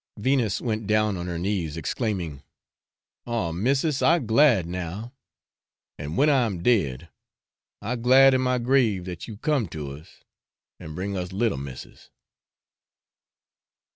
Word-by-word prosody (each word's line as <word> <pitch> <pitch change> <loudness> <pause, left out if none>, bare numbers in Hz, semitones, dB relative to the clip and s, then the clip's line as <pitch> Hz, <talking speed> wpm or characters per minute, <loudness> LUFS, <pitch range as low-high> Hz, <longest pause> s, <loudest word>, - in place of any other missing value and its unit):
Venus 115 -2 +1
went 110 -3 -3
down 105 -1 +2
on 90 0 -5
her 85 -1 -3
knees, 85 -4 -2
exclaiming, 85 - -3 0.9
'Oh, 115 -9 -1
missis, 135 - 0
I 170 - +5
glad 115 - +3
now; 90 +7 -6 0.9
and 75 +4 -5
when 145 - +4
I 135 -5 +3
am 90 -5 -5
dead, 85 - +1 0.7
I 120 +4 -2
glad 130 +3 +6
in 130 - +2
my 125 0 +1
grave 120 -7 +2
that 90 -2 -7
you 110 -3 -8
come 140 -3 0
to 75 -4 -6
us 75 +3 -13 0.6
and 80 0 -9
bring 100 +2 -3
us 90 -1 -4
little 105 - 0
missis.' 70 -2 -10
105 Hz, 140 wpm, -25 LUFS, 85-125 Hz, 0.9 s, glad